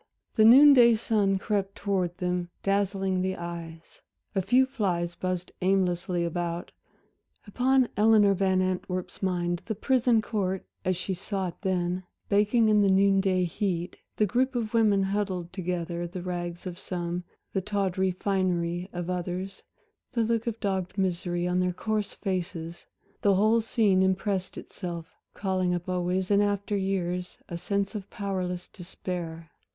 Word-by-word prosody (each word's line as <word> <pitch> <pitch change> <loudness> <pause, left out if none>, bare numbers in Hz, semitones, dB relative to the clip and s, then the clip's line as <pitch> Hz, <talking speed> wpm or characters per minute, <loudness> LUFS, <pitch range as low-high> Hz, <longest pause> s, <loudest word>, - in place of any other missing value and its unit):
The 215 - +5
noon 280 +6 +9
day 235 -3 +7
sun 210 -3 +1
crept 195 0 -1
towards 185 -4 -1
them, 180 -1 -2
dazzling 195 -1 +1
the 190 0 -1
eyes, 170 -1 -8 0.3
a 195 - +1
few 250 +8 +4
flies 185 -10 -1
buzzed 180 0 -3
aimlessly 180 -2 +1
about. 170 0 -3 0.7
Upon 255 +4 +2
Eleanor 210 -1 +5
Van 190 -1 +2
Antwerp's 185 -1 -3
mind 175 -2 0
the 220 - -2
prison 245 +1 +3
court, 195 -4 -2 0.2
as 185 -1 0
she 190 +1 -3
saw 190 0 -3
it 170 - -14
then, 180 -2 0 0.3
baking 210 +3 +3
in 210 -1 +5
the 200 - +4
noon 195 0 +4
day 185 -2 +2
heat 180 -1 -2 0.2
the 215 - +4
group 255 +5 +1
of 230 -2 -2
women 210 -4 +4
huddled 190 -3 -2
together, 175 -2 -3
the 175 +1 -7
rags 175 -1 -4
of 180 -1 -6
some, 175 -1 -3 0.3
the 195 - +1
tawdry 190 -2 0
finery 180 -2 -1
of 175 -1 -4
others, 180 +2 -4 0.5
the 235 -2 +2
look 230 +1 0
of 230 -1 -2
dogged 190 -2 -2
misery 175 -2 0
on 180 0 +1
their 180 0 +1
coarse 215 +2 -2
faces 175 -3 -4 0.3
the 200 -1 +4
whole 215 +4 +4
scene 210 -4 +2
impressed 190 0 0
itself, 170 -2 -7 0.2
calling 185 -2 0
up 175 +1 -5
always 185 +1 -1
in 200 0 +5
after 205 0 0
years 180 -2 -2
a 170 - -4
sense 200 +2 -1
of 205 -3 -6
powerless 185 -3 -3
despair. 170 -2 -6
190 Hz, 150 wpm, -27 LUFS, 180-205 Hz, 0.7 s, noon